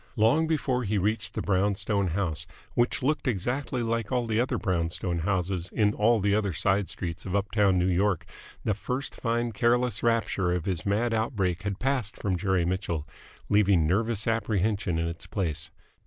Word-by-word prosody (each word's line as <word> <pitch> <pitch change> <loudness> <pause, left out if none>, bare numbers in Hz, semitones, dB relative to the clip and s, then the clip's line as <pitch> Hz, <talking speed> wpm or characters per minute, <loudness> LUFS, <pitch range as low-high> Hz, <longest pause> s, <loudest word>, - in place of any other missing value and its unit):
Long 120 +10 +3
before 135 -5 0
he 105 -1 0
reached 105 +1 0
the - - -2
brown 100 +1 +2
stone 100 -1 0
house, 85 -2 -2 0.3
which 120 +1 +1
looked 150 +1 0
exactly 125 +4 -1
like 115 -1 -1
all 125 -2 +1
the 110 -1 0
other 125 - +1
brown 85 -5 0
stone 85 0 -2
houses 90 0 -1
in 105 -1 +2
all 115 +2 +3
the 100 0 +2
other 100 -3 +1
side 100 +4 +1
streets 85 -2 -4
of 95 0 -3
uptown 100 -1 +2
New 90 - +2
York, 95 0 +1 0.4
the 105 - +1
first 125 +6 -3
fine 120 0 -1
careless 120 +1 +1
rapture 110 -6 +1
of 90 -3 -2
his 95 -1 -2
mad 115 +4 +1
outbreak 105 -6 0
had 100 -2 -3
passed 130 -4 -1
from 95 -3 -1
Jerry 95 -1 +1
Mitchell, 85 -4 -2 0.4
leaving 100 -5 +4
nervous 105 +5 0
apprehension 105 -4 0
in 85 0 0
its 85 0 -6
place. 80 -7 -2
100 Hz, 180 wpm, -27 LUFS, 90-115 Hz, 0.4 s, leaving